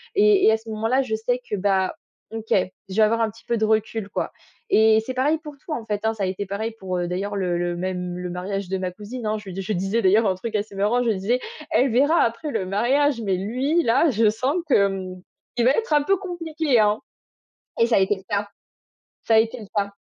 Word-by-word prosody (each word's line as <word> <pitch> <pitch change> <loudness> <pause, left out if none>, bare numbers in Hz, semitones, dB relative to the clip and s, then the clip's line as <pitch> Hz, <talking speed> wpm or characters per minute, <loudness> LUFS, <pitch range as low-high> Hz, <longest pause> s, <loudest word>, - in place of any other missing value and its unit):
Et 410 -1 +5
et - - +7
à - - +2
ce 225 0 -13
moment-là, 225 +5 +1
je 220 -5 -2
sais 245 +3 -1
que, 210 - -1
bah, 190 -1 +1 0.4
OK, 225 0 -6 0.4
je 190 - -6
vais 220 - +3
avoir 225 +2 +2
un 225 - +2
petit 225 +2 -16
peu 235 - 0
de 220 - +1
recul, 220 -1 0
quoi. - - -3 0.4
Et 220 - +5
c'est 255 - -4
pareil 280 +5 +2
pour 300 -2 -9
tout, 325 - -11
en 240 -7 -3
fait, 210 -1 -2
hein. 220 0 +1
Ça 205 - -3
a - - +2
été 190 +2 -3
pareil 210 +4 -3
pour, 185 -1 -3
d'ailleurs, 195 +3 -3
le 180 -3 -1
le 175 0 -1
même 180 0 -3
le 180 0 -4
mariage 190 +1 -4
de 190 - -1
ma 185 -1 -2
cousine, 215 +5 -7
hein. 215 0 0
Je 210 -1 -11
lui 190 +2 -5
je 195 - -4
disais 195 +5 0
d'ailleurs 210 +3 +4
un 195 - +3
truc 215 +4 -6
assez 205 0 -2
marrant. 210 +5 +1
Je 235 - +2
disais: 215 +5 0 0.3
«Elle 260 0 +3
verra 285 +8 +4
après 235 +6 -2
le 220 -8 -2
mariage, 240 +7 +1
mais 195 -4 0
lui, 260 - 0
là, 270 +7 +3
je 225 -3 +3
sens 255 +7 -1
qu'il 195 0 -1
va 255 - +6
être 450 -5 -1
un 295 - +5
peu 390 +7 +2
compliqué, 325 - -1
hein» 210 0 +3 0.8
et 230 - +6
ça 235 - +2
a - - +6
été 195 +1 +2
le 190 - -13
cas. 205 0 -1 0.8
Ça 225 - +3
a - - +8
été 225 +2 0
le 215 - -9
cas. 200 -1 +1
220 Hz, 245 wpm, -23 LUFS, 195-250 Hz, 0.8 s, a